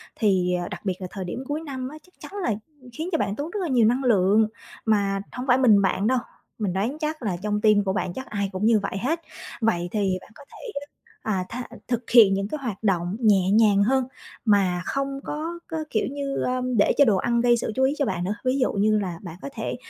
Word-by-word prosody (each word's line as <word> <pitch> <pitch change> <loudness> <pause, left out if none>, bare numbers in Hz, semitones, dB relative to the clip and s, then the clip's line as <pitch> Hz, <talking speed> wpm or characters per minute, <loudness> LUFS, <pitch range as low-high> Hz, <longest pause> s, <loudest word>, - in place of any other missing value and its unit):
thì 185 -5 +2 0.2
đặc - - -6
biệt 185 -1 -2
là 185 - -4
thời 190 -2 -5
điểm 235 +9 -5
cuối 300 +2 -2
năm 260 -4 -5
á 305 - -10
chắc 365 - -24
chắn - - -10
là 230 - +1 0.4
khiến 320 +7 -4
cho 325 - +2
bạn 200 - -1
tốn 295 +7 -4
rất 420 - -3
là 345 - -1
nhiều 240 -5 +4
năng 250 +3 +1
lượng. 215 -2 +4 0.4
Mà 200 -3 +2
hông 250 +1 -6
phải 250 -1 +5
mình 220 -6 +5
bạn 195 +2 +1
đâu, 255 +1 +3 0.4
mình 200 -5 -1
đoán 225 +10 -1
chắc 310 -3 -3
là 185 -5 -1
trong 210 +2 -2
team 210 -1 +5
của 190 -1 -1
bạn 185 - -2
chắc 260 - -6
ai 200 -2 -2
cũng 190 +2 -2
như 225 -1 +5
vậy 195 -1 -4
hết. 310 +11 -1 0.4
Vậy 175 -6 +1
thì 195 -3 0
bạn - - -17
có 285 - -13
thể, - - -9 0.5
à, 190 -4 -1
tha 250 - -4 0.2
thực 240 -1 -2
hiện 220 -5 +8
những 195 +1 -1
cái 305 - -4
hoạt 220 -4 -4
động 180 -2 +1
nhẹ 195 -5 +4
nhàng 205 -2 +5
hơn 265 +4 +2 0.4
mà 190 -5 +3
không 275 0 -2
có 325 +3 -4
có 325 - -4
kiểu 215 - 0
như, 280 -1 -3
a, 255 0 0 0.2
để 205 - +4
cho 285 - +7
đồ 205 -5 +3
ăn 235 +3 +1
gây 240 0 +4
sự 225 - -2
chú 265 - +2
ý 270 +2 +3
cho 285 - +1
bạn 180 -4 -2
nữa, 200 +3 -1
ví 255 +2 +2
dụ 255 - +2
như 210 +1 +3
là 180 -4 -4
bạn 170 -3 -7
có 280 - -5
thể - - -3
220 Hz, 245 wpm, -24 LUFS, 195-260 Hz, 0.5 s, hiện